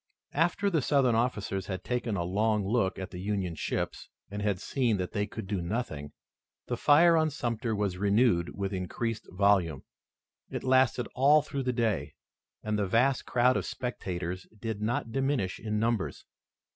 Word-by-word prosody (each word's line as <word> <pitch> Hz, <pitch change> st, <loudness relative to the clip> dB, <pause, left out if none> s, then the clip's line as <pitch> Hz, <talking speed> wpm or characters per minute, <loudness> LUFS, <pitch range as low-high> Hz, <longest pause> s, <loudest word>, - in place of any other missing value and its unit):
After 175 Hz, +6 st, +1 dB
the 160 Hz, -4 st, +2 dB
Southern 135 Hz, -3 st, +3 dB
officers 105 Hz, -5 st, -1 dB
had 95 Hz, -2 st, -4 dB
taken 120 Hz, -2 st, -1 dB
a 85 Hz, -, 0 dB
long 105 Hz, +3 st, +1 dB
look 100 Hz, -4 st, +1 dB
at 95 Hz, -, -6 dB
the 90 Hz, 0 st, -7 dB
Union 95 Hz, -3 st, -1 dB
ships, 80 Hz, -, -3 dB, 0.2 s
and 105 Hz, 0 st, -4 dB
had 100 Hz, -3 st, 0 dB
seen 120 Hz, -3 st, 0 dB
that 90 Hz, -1 st, -3 dB
they 105 Hz, -1 st, -1 dB
could 100 Hz, -, -7 dB
do 95 Hz, -2 st, -2 dB
nothing, 85 Hz, -7 st, -3 dB, 0.5 s
the -, -, -2 dB
fire 165 Hz, +3 st, +6 dB
on 155 Hz, -1 st, +3 dB
Sumter 120 Hz, -5 st, -2 dB
was 100 Hz, -3 st, -1 dB
renewed 100 Hz, -3 st, +2 dB
with 100 Hz, 0 st, -2 dB
increased 110 Hz, +5 st, -3 dB
volume. 90 Hz, -7 st, +2 dB, 0.7 s
It -, -, -4 dB
lasted 130 Hz, -2 st, +3 dB
all 145 Hz, +3 st, +5 dB
through 140 Hz, -2 st, -4 dB
the 125 Hz, -, +2 dB
day 110 Hz, -, -1 dB, 0.5 s
and 105 Hz, -1 st, -1 dB
the 100 Hz, -, 0 dB
vast 125 Hz, +6 st, +2 dB
crowd 125 Hz, +1 st, +3 dB
of -, -, -1 dB
spectators 90 Hz, -7 st, -4 dB
did 110 Hz, -2 st, -4 dB
not 115 Hz, +1 st, -1 dB
diminish 135 Hz, -7 st, 0 dB
in 105 Hz, -1 st, -2 dB
numbers. 115 Hz, -1 st, -1 dB
110 Hz, 170 wpm, -29 LUFS, 95-125 Hz, 0.7 s, fire